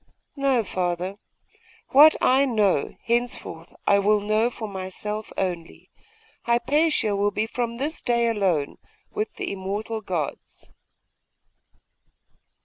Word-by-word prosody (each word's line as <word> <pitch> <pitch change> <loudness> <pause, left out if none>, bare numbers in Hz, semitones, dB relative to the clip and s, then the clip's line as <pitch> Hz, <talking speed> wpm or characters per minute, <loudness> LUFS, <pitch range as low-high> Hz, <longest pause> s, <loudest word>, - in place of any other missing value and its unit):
'No, 275 -4 +2
father. 180 0 -2 0.7
What 300 +3 +8
I 265 +2 +4
know, 210 - +1
henceforth 235 -8 -2
I 200 - +4
will 210 +1 +3
know 215 +3 +1
for 225 -2 -7
myself 205 +2 -5
only. 175 -3 -4 0.5
Hypatia 240 -1 +2
will 200 +1 +2
be 215 +1 -1
from 235 0 -3
this 290 +6 -2
day 235 -1 +1
alone 190 -10 0 0.3
with 215 +1 -3
the - - -4
Immortal 205 +3 -4
Gods! 175 -7 -5
215 Hz, 110 wpm, -24 LUFS, 190-240 Hz, 0.7 s, What